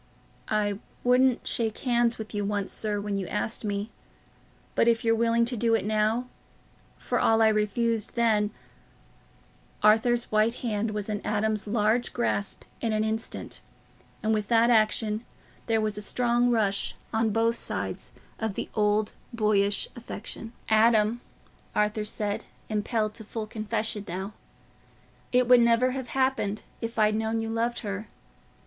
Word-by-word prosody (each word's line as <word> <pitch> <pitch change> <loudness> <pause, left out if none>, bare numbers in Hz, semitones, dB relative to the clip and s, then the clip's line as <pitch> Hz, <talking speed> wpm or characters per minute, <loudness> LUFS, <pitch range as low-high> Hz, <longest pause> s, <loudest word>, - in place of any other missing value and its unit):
"I 205 -2 0 0.2
wouldn't 250 0 +3
shake 225 -2 -1
hands 240 -2 +2
with 220 0 -7
you 205 -1 -1
once, 200 -1 -1
sir, 210 -2 -1
when 205 -1 -2
you 190 - -4
asked 220 +3 -2
me—but 205 +2 -5
if 230 0 +2
you're 225 - +4
willing 230 +1 +3
to 245 +1 -2
do 230 0 +2
it 225 - -1
now, 215 +3 +1 0.7
for - - -1
all 225 0 +4
I 220 -1 +6
refused 215 +1 0
then..." 220 -3 +3 1.3
Arthur's 230 +3 +4
white 215 +2 +3
hand 220 -1 0
was 210 -1 -3
in 210 -1 -2
Adam's 210 0 0
large 220 +2 +1
grasp 110 -3 -1 0.2
in 225 -2 0
an 215 0 +1
instant, 220 +1 -4 0.6
and 220 +1 +2
with 210 -2 -1
that 235 +1 +4
action 215 0 +2 0.4
there 225 -1 +2
was 215 -1 0
a - - -1
strong 240 +2 +1
rush, 205 -4 +1 0.2
on 220 0 +2
both 225 +2 +2
sides, - - -3 0.3
of 220 -3 -2
the - - -4
old, 210 0 +1 0.2
boyish 210 -3 +1
affection. 225 -1 -7 0.2
"Adam," 220 +1 +4 0.5
Arthur 210 0 +1
said, 210 -1 0 0.3
impelled 215 0 0
to 220 - -9
full 220 +1 -5
confession 215 -1 -3
now, 190 +4 -4 1.0
"it 250 -1 +3
would 250 -1 +7
never 235 +2 +4
have 260 -1 -4
happened 260 -5 0 0.2
if 230 0 -4
I'd 215 -1 +4
known 220 +1 0
you 225 0 -3
loved 235 +1 -1
her. 205 -1 -4
220 Hz, 150 wpm, -27 LUFS, 210-230 Hz, 1.3 s, would